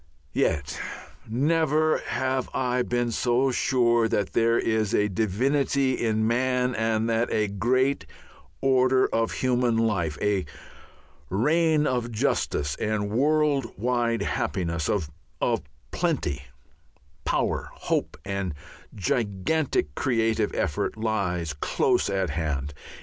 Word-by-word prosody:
Yet 70 -3 0 0.5
never 155 +4 +2
have 130 0 -2
I 125 -1 +1
been 120 -1 0
so 125 +3 +2
sure 120 -3 +2
that 105 -2 -1
there 115 0 +3
is 110 -2 +1
a 105 - +3
divinity 130 +7 +1
in 110 -1 +1
man 125 +2 +1
and 110 0 0
that 115 +1 +1
a 105 -1 +1
great 125 - +1 0.5
order 130 -1 +4
of 115 0 +1
human 125 -2 +1
life, 90 -10 0
a 105 -2 +1 0.9
reign 155 - +2
of 120 -3 -1
justice 70 -9 0
and 105 -1 -1
world 145 +1 +1
wide 120 +1 0
happiness, 85 -3 -1
of 80 -5 -2 0.3
plenty, 70 0 -1 0.8
power, - - -1
hope, - - -2
and 100 -5 -3 0.4
gigantic 100 - 0
creative 115 - +1
effort, 90 +2 -1
lies 95 -7 -1
close 75 - +1
at 95 -4 0
hand. 75 -2 -2
115 Hz, 110 wpm, -26 LUFS, 100-130 Hz, 0.9 s, order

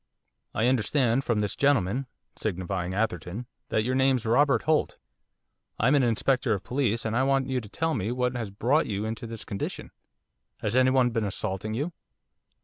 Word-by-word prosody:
'I 110 - +2
understand 125 +1 +2
from 115 -4 +1
this 105 -2 -1
gentleman 135 -2 +2
' - - -51
signifying 95 -2 -2
Atherton 105 +1 -2 0.2
'that 110 - +1
your 125 +3 0
name's 130 -2 +2
Robert 125 +1 +3
Holt. 155 -1 +1 0.8
I'm 130 +6 +4
an 145 - +5
Inspector 125 +1 +1
of 100 -3 0
police, 120 -4 0
and 110 0 -1
I 125 - +3
want 135 0 +2
you 130 -1 0
to 105 - -11
tell 160 +8 -1
me 110 -3 -1
what 125 0 0
has 115 -4 -3
brought 125 +11 +1
you 105 0 -2
into 115 +1 -4
this 115 -1 -7
condition. 100 -3 -5 0.7
Has 105 +2 -1
anyone 130 -1 +4
been 115 -1 0
assaulting 100 +1 -2
you? 150 +8 -2
115 Hz, 175 wpm, -27 LUFS, 105-130 Hz, 0.8 s, an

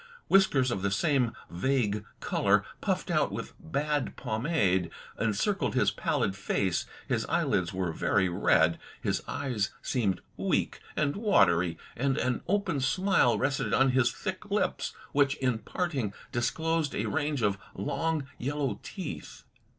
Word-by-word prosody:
Whiskers 145 -10 +4
of 100 - -2
the 100 - +1
same 125 - +2 0.2
vague 105 +1 0 0.2
colour - - +2 0.2
puffed - - -1
out - - +2
with - - -5
bad 145 - -1
pomade, 110 - +1 0.3
encircled 115 - 0
his 105 -6 +3
pallid 100 0 0
face. 95 -2 0 0.2
His - - 0
eyelids 85 -1 +1
were 95 -2 -1
very 95 +3 +2
red; 90 - +3 0.2
his - - -1
eyes 115 -7 -1
seemed 100 -8 0 0.2
weak - - 0 0.2
and 145 -2 +1
watery, 90 - +3 0.2
and 135 +2 0
an 125 -3 0
open 195 -6 +1
smile 135 - +3
rested 135 +6 0
on 135 0 +4
his 130 -1 +3
thick - - -5
lips, - - 0 0.2
which, 140 -1 +3
in 125 -5 0
parting, 130 - -2 0.2
disclosed 160 +5 0
a - - -1
range 145 -4 -1
of 100 -1 +1 0.2
long 155 +8 -1
yellow 140 +1 -1
teeth. - - -7
125 Hz, 135 wpm, -29 LUFS, 100-145 Hz, 0.3 s, Whiskers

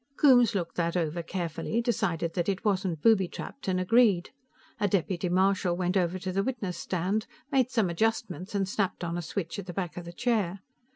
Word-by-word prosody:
Coombes 245 -7 +6
looked 170 -3 -3
that 170 0 0
over 165 0 -1
carefully, 175 +5 -3
decided 170 -9 0
that 175 +1 0
it 195 +2 -2
wasn't 190 -6 0
booby 215 -5 +5
trapped 275 - -8
and 185 -1 +1
agreed. 200 -2 +3 0.5
A 205 - +2
deputy 180 -1 0
marshal 185 -1 +2
went 180 +1 0
over 180 -1 +1
to 185 0 -4
the 195 +2 +1
witness 210 -6 -3
stand, 190 +4 -1 0.2
made 260 -2 +3
some 225 -6 +2
adjustments 185 0 -1
and 195 -1 +1
snapped 190 -2 -1
on 170 0 -2
a 175 - -2
switch 175 +2 -4
at 195 - -7
the 175 - -5
back 180 -1 -4
of 175 - -6
the 170 - -7
chair. 200 -4 0
185 Hz, 195 wpm, -28 LUFS, 175-210 Hz, 0.5 s, Coombes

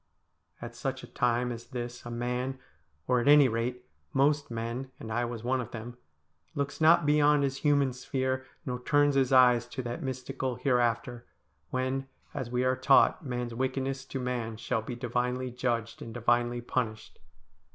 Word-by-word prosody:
At 120 0 -7
such 130 +1 -3
a - - -9
time 125 -1 +1
as 120 0 -7
this 120 -2 -6
a - - -5
man 125 +2 -2 0.3
— 75 -1 -43
or, 125 -1 +3
at 120 - -1
any 145 -1 +8
rate, 125 +2 -2 0.3
most 145 +2 +2
men, 115 +3 -4
and 110 - -7
I 120 +2 +1
was 120 -2 -6
one 130 +1 +1
of 120 - -7
them 120 +1 -7 0.3
— 75 +1 -41
looks 140 +2 -3
not 160 -1 +6
beyond 150 -1 +4
his 135 -1 -1
human 140 -3 +2
sphere, 130 +1 -2 0.2
nor 125 -3 -3
turns 145 +2 +3
his 135 -1 +2
eyes 125 -2 +6
to 130 +1 -5
that 120 0 -4
mystical 130 0 -3
hereafter, 120 -1 0 0.4
when, 130 +1 -1 0.3
as 120 - -4
we 125 +1 0
are 130 0 +2
taught, 130 +6 +4
man's 125 -3 -3
wickedness 130 +2 -2
to 135 - -5
man 120 -3 -3
shall 115 +1 -1
be 120 +3 -6
divinely 125 +1 -2
judged 120 -2 -2
and 115 0 -8
divinely 120 0 +1
punished. 120 -2 -3
125 Hz, 175 wpm, -29 LUFS, 120-130 Hz, 0.4 s, any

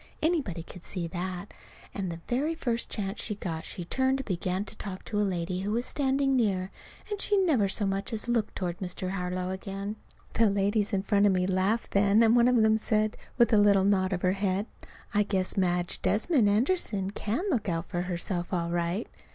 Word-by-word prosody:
Anybody 290 - 0
could 180 +1 -12
see 175 0 -4
that. 185 +2 -5 0.4
And 190 -3 -3
the 165 0 -7
very 290 +7 0
first 240 -7 -2
chance 200 0 -3
she 210 - -3
got 165 -5 -5
she 175 - -6
turned 260 +7 +1
and 270 - -5
began 185 +1 -2
to - - -7
talk 190 -2 -7
to 210 - -2
a - - +3
lady 180 -2 -1
who 200 +2 -2
was 240 +2 0
standing 270 -1 +1
near. 195 -6 +1 0.4
And 410 -1 -2
she 410 - +2
never 295 - +3
so 205 +2 0
much 195 0 -2
as 225 +1 -2
looked 235 -3 0
toward 175 -2 -3
Mr. 185 0 -4
Harlow 180 -1 -2
again. 195 +2 -5 0.4
The 225 -1 +4
ladies 200 +1 +1
in 195 -2 0
front 205 0 +3
of - - +4
me 180 -1 +1
laughed 190 +5 0
then, 200 +2 +4
and 225 +1 +5
one 240 0 +5
of 250 - +4
them 220 0 +4
said, 215 -1 +1 0.2
with 235 -2 +4
a - - +6
little 200 -2 +5
nod 190 -1 +2
of 180 -2 -2
her 180 - +4
head, 195 +1 0 0.5
"I 210 - +4
guess 190 -2 -1
Madge 180 -2 0
Desmond 225 - +3
Anderson 210 - +1
can 215 - -2
look 225 - 0
out 165 0 -2
for 175 - -2
herself 175 0 -3
all 170 -2 -1
right." 175 +5 -1
200 Hz, 210 wpm, -28 LUFS, 185-225 Hz, 0.5 s, a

